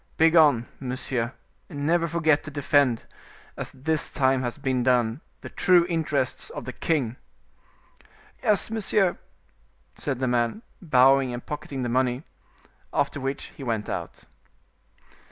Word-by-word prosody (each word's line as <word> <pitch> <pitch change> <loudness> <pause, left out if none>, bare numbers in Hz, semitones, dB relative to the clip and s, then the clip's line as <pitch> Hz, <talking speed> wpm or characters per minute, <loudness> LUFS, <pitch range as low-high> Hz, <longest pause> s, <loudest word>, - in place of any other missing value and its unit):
Begone, 160 -7 +5
monsieur, 125 -2 -2 0.4
and 145 -4 -5
never 170 +1 +2
forget 160 -3 +2
to - - -7
defend, 140 -4 +2 0.5
as - - -6
this 155 +4 -2
time 130 -2 +2
has 120 0 -3
been 130 -3 0
done, 120 +1 +2 0.2
the - - -8
true 180 -2 +4
interests 160 -6 -1
of - - -7
the 125 - -5
king." 130 -7 -1 1.2
"Yes, 215 -2 +2
monsieur," 205 -4 +1 0.7
said 135 -3 -3
the 130 +1 -1
man, 120 - 0 0.2
bowing 135 -4 +4
and 120 - -8
pocketing 140 -3 -5
the - - -1
money. 125 +2 +1 0.7
After - - 0
which 135 +1 -4
he 140 - -9
went 115 -4 -2
out. - - -5
135 Hz, 135 wpm, -25 LUFS, 125-160 Hz, 1.2 s, Begone